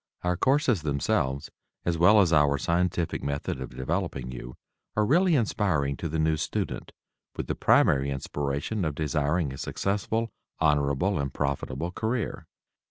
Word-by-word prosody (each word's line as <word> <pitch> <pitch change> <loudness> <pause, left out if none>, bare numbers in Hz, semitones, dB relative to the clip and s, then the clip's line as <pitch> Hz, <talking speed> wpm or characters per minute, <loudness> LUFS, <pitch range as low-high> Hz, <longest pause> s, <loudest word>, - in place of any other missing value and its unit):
Our 90 0 +1
courses 130 - +2
themselves, 70 -2 -1 0.3
as 85 - +1
well 100 +6 +6
as 85 -4 +3
our 75 -2 +4
scientific 85 +3 0
method 70 -2 -3
of 65 - -7
developing 70 -3 -2
you, 60 0 -8 0.4
are 105 - +3
really 175 - +4
inspiring 95 - +1
to 80 - -4
the 80 - -2
new 80 0 +2
student - - -3 0.4
with - - -3
the - - -2
primary 70 0 +3
inspiration 70 +8 -2
of 75 -3 -1
desiring 75 0 0
a 65 - -8
successful, 110 +3 -1 0.3
honorable 75 +3 +2
and 70 -1 -2
profitable 70 +3 -2
career. 110 +3 -3
80 Hz, 145 wpm, -27 LUFS, 70-95 Hz, 0.4 s, well